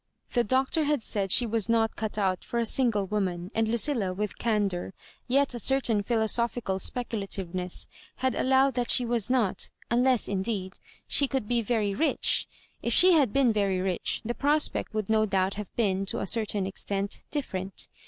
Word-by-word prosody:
The 240 - +3
Doctor 265 +6 +1
had 290 -5 0
said 195 -3 -2
she 245 - +5
was 225 -1 0
not 225 -1 +1
cut 220 -1 -4
out 190 -3 0
for 235 - -5
a 235 - +1
single 225 -5 +1
woman; 185 -2 -3
and 225 0 +1
Lucilla, 225 -5 +1
with 210 +1 -4
candour, 200 -5 -1 0.3
yet 275 +1 +2
a 240 - -5
certain 240 -4 +2
philosophical 225 -2 0
speculativeness, 195 -7 -1 0.3
had 260 0 -1
allowed 265 +1 +2
that 245 -1 -2
she 245 - +4
was 235 -2 0
not 245 -7 0
— - - -28
^unless, 250 -1 +3
indeed, 190 -1 -3 0.3
she 280 - +4
could 265 -5 -3
be 240 0 +1
very 215 -3 -1
rich. 315 +11 +2 0.3
If - - -1
she 370 +1 +7
had 290 - +3
been 260 -3 +3
very 200 -3 0
rich, 185 -2 -2
the 240 - -2
prospect 295 +4 0
would 215 -3 -2
no 220 0 +2
doubt 190 -1 0
have 210 -1 -7
been, 195 -4 0
to - - -2
a - - -2
certain 210 -2 0
extent, 195 +1 -3
different. 195 -10 -4
220 Hz, 180 wpm, -27 LUFS, 195-245 Hz, 0.3 s, she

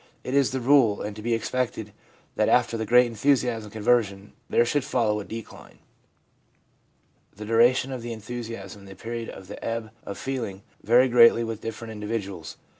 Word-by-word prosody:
It 125 - -4
is 140 -2 +3
the 130 - -2
rule, 120 -5 +4
and 105 0 -5
to 105 - -8
be 115 +1 0
expected 115 -3 -3 0.4
that - - +2
after 120 -1 +3
the 110 -1 -3
great 125 +2 +6
enthusiasm 120 -1 0
of - - -13
conversion 105 -2 0 0.2
there 120 - +3
should 145 +3 0
follow 110 -5 0
a - - -5
decline. 115 +2 -10 1.6
The 105 +2 -8
duration 120 +4 +3
of 130 -2 -5
the 120 0 -6
enthusiasm 110 -3 -7
and 100 - -14
the 95 - -10
period 115 +1 -6
of 95 - -10
the 100 - -9
ebb 115 -1 -3
of 100 - -7
feeling 115 -8 -4 0.2
vary 120 +4 +5
greatly 115 -1 +6
with 115 -1 -5
different 115 0 -6
individuals. 105 -5 -5
115 Hz, 180 wpm, -25 LUFS, 105-120 Hz, 1.6 s, great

